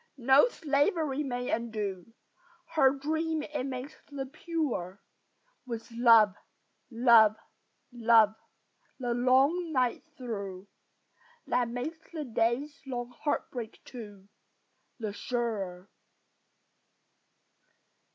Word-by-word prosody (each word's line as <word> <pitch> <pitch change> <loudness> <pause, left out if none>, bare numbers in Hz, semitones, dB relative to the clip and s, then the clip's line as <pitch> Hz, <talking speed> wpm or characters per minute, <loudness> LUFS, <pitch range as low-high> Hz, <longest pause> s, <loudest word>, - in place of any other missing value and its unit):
No 265 - +6
slavery 295 - 0
may 250 -3 -3
undo 215 -4 -3 0.6
Her 275 -5 +6
dream 315 +3 -1
it 280 -4 -4
makes 265 +3 -6
the 280 -2 -4
purer, 275 - -3 0.7
With 230 -1 -6
"love, 230 -3 +6 0.6
love, 230 -3 +6 0.6
love," 230 -3 +5 0.7
the 245 -2 -1
long 270 +8 +3
night 255 -4 +1 0.2
through, 200 -6 -6 0.8
That 245 -2 +1
makes 260 +7 -4
the 315 -3 -4
day's 245 +5 -1
long 245 -2 -4
heartbreak 245 -4 -4
too 205 -6 -10 0.7
The 215 -4 -4
surer. 205 -6 -3
245 Hz, 90 wpm, -30 LUFS, 225-280 Hz, 0.8 s, No